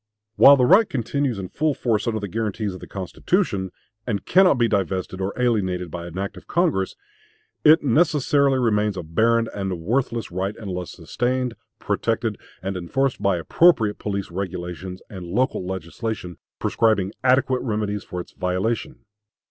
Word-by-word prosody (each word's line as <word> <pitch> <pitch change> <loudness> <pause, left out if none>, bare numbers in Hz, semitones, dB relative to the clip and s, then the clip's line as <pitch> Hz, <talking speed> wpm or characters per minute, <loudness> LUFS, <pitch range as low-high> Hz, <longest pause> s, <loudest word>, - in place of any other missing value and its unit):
While 140 0 +8
the 125 - +4
right 210 - +6
continues 130 0 -1
in 95 -2 -5
full 155 -2 0
force 115 -2 0
under 110 -2 0
the 100 - -4
guarantees 105 0 -2
of 90 - -8
the - - -10
Constitution, 100 - -1 0.4
and 105 -5 -2
cannot 185 -3 +5
be 120 -1 +3
divested 95 -2 -1
or 95 +1 -1
alienated 95 -8 0
by 85 0 -6
an 85 +1 -9
act 100 +1 -4
of - - -13
Congress, 160 - +1 0.7
it 155 0 +6
necessarily 145 -1 +3
remains 105 -4 +1
a 90 - -4
barren 115 +8 +2
and 95 -1 -3
a - - -1
worthless 115 +6 -1
right, 95 +3 -2
unless 90 -5 -5
sustained, 125 0 -2 0.2
protected, - - -1 0.2
and 95 0 -3
enforced 125 +9 -1
by 100 -3 +2
appropriate 110 - +3
police 100 -3 -3
regulations 90 0 -5
and 95 -4 -8
local 115 +2 0
legislation, 95 +1 -5 0.2
prescribing 110 -4 +1
adequate 130 0 +3
remedies 105 -3 -2
for 90 - -6
its 90 - -8
violation. 95 +6 -2
105 Hz, 155 wpm, -23 LUFS, 95-125 Hz, 0.7 s, While